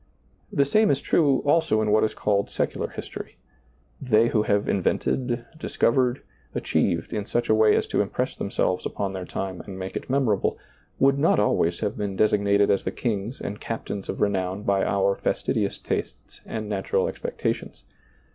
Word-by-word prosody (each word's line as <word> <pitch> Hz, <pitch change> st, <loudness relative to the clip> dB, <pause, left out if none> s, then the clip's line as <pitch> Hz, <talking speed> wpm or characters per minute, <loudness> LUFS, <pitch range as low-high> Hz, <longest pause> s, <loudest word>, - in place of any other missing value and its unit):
The 140 Hz, -, +3 dB
same 215 Hz, +9 st, +3 dB
is 140 Hz, -, +2 dB
true 140 Hz, -3 st, +2 dB
also 150 Hz, -6 st, +3 dB
in 110 Hz, -1 st, +1 dB
what 110 Hz, -, +4 dB
is 110 Hz, -, 0 dB
called 100 Hz, -1 st, 0 dB
secular -, -, -2 dB
history. -, -, -8 dB, 0.6 s
They 115 Hz, -3 st, +3 dB
who 110 Hz, -, +2 dB
have 100 Hz, -1 st, +1 dB
invented, 120 Hz, +5 st, 0 dB
discovered, 125 Hz, -3 st, +1 dB, 0.3 s
achieved, 85 Hz, +5 st, 0 dB
in 105 Hz, -2 st, -3 dB
such 120 Hz, -, -1 dB
a -, -, +6 dB
way 110 Hz, 0 st, +5 dB
as -, -, +1 dB
to -, -, +2 dB
impress -, -, -2 dB
them -, -, -4 dB
selves 90 Hz, 0 st, 0 dB
upon 100 Hz, -1 st, -3 dB
their 95 Hz, -1 st, -5 dB
time 95 Hz, 0 st, -4 dB
and 95 Hz, -2 st, -9 dB
make 95 Hz, 0 st, -6 dB
it -, -, -5 dB
memorable, 125 Hz, -7 st, +1 dB, 0.4 s
would 140 Hz, +1 st, +3 dB
not 155 Hz, -, +4 dB
always 85 Hz, -4 st, +1 dB
have 105 Hz, -2 st, -2 dB
been 100 Hz, -2 st, -2 dB
designated 100 Hz, -1 st, +3 dB
as 100 Hz, -, +1 dB
the -, -, -1 dB
kings 110 Hz, 0 st, -3 dB
and 100 Hz, +1 st, -5 dB
captains 105 Hz, -3 st, -5 dB
of -, -, -3 dB
renown 95 Hz, -1 st, 0 dB
by 100 Hz, -1 st, +2 dB
our 100 Hz, 0 st, +2 dB
fastidious -, -, -1 dB
tastes -, -, -5 dB
and 110 Hz, -1 st, -4 dB
natural 100 Hz, -2 st, 0 dB
expectations. -, -, -4 dB
105 Hz, 175 wpm, -25 LUFS, 100-120 Hz, 0.6 s, a